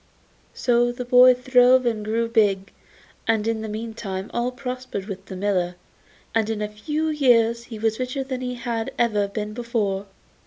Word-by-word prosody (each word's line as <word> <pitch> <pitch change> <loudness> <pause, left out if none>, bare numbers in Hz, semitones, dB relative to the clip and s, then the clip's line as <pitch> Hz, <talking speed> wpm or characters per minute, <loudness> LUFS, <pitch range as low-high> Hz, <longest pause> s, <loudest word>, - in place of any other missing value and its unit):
So 240 -1 +2
the 245 +1 -6
boy 250 +1 +7
throve 250 0 +4
and 225 -3 0
grew 225 +2 0
big, 205 -4 +1 0.5
and 225 -1 +1
in 225 -1 -1
the 220 - -5
meantime 215 -3 -5
all 240 +1 0
prospered 250 -5 -5
with 195 -2 -7
the 190 - -7
miller, 185 -2 0 0.6
and 225 -1 +1
in 220 -1 -2
a - - -1
few 300 +10 -2
years 235 -6 +3
he 230 -2 -8
was 220 +1 0
richer 255 +2 -2
than 260 -1 -5
he 250 -1 -3
had 235 -2 -3
ever 210 -4 +2
been 210 +1 -5
before. 215 -4 -2
230 Hz, 170 wpm, -23 LUFS, 210-250 Hz, 0.6 s, boy